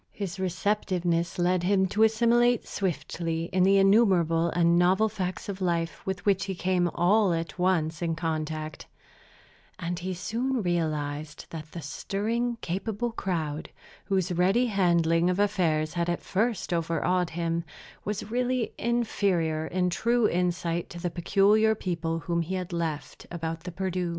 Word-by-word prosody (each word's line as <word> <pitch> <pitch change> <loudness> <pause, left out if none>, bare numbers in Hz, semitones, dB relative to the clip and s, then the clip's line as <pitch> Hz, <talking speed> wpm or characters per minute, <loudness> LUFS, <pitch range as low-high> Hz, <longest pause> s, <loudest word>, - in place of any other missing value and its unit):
His 195 -2 -5
receptiveness 180 -2 0
led 180 0 +2
him 190 +1 +3
to 210 - -1
assimilate 235 +2 +3
swiftly 165 -1 -3
the 190 +1 +4
innumerable 190 -5 +4
and 170 0 +3
novel 185 +5 +4
facts 185 -2 -4
of 195 -1 -5
life 170 -2 -1
with 190 +1 -3
which 195 -2 +2
he 195 -1 -3
came 180 0 +1
all 190 +3 +3
at 165 +1 -4
once 165 -4 +1
in 165 -1 0
contact; 155 -2 -4 0.9
and 170 +1 -3
he 185 +1 -3
soon 230 +6 -2
realized 155 -3 -2
that 155 -2 -8
the 170 - -6
stirring, 230 +9 -2
capable 210 +6 -2
crowd, 160 -8 -3 0.4
whose 190 -2 0
ready 185 +8 +3
handling 170 -5 +2
of 180 - 0
affairs 160 -6 +1
had 170 0 -1
at 175 - -2
first 215 -1 -1
overawed 170 +2 0
him, 170 0 -2 0.4
was 210 +1 -4
really 250 -1 0
inferior 190 -9 0
in 180 +1 0
true 235 +5 +2
insight 175 -1 -1
to 175 - -8
the 175 0 -2
peculiar 205 +5 +3
people 165 -4 -2
whom 170 +2 -1
he 175 +3 -3
had 185 -1 -4
left 160 -3 -4
about 165 -1 -5
the 180 - -4
Perdu. 185 -1 -2
180 Hz, 145 wpm, -27 LUFS, 165-200 Hz, 0.9 s, the